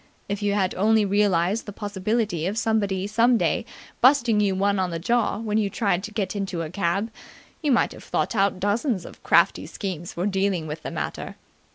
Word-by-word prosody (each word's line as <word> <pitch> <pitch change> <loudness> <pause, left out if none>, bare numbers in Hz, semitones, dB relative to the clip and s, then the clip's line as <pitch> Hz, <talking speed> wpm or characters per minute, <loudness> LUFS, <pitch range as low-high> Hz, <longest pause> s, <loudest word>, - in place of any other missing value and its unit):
If 200 +1 -3
you 205 0 +1
had 190 -3 +1
only 215 +2 +3
realized 200 +1 +1
the - - -5
possibility 205 -3 -2
of 205 +3 -3
somebody 205 -4 0
some 230 +4 +3
day - - 0 0.3
busting 245 -4 +5
you 200 -2 +2
on 200 -2 +1
the 170 - -3
jaw 235 +7 +1
when 215 -1 -1
you 205 -2 0
tried 195 -3 0
to 215 - -8
get 205 -2 -2
into 190 -4 -3
a 155 - -6
cab, 195 +3 -1 0.5
you 300 -3 +1
might 245 - +3
have - - -11
thought - - -1
out 195 -2 +2
dozens 205 - 0
of - - -12
crafty - - +3
schemes 175 -4 -5
for 175 - -2
dealing 195 -4 0
with 155 0 -6
the - - -5
matter. - - -5
200 Hz, 195 wpm, -24 LUFS, 185-220 Hz, 0.5 s, busting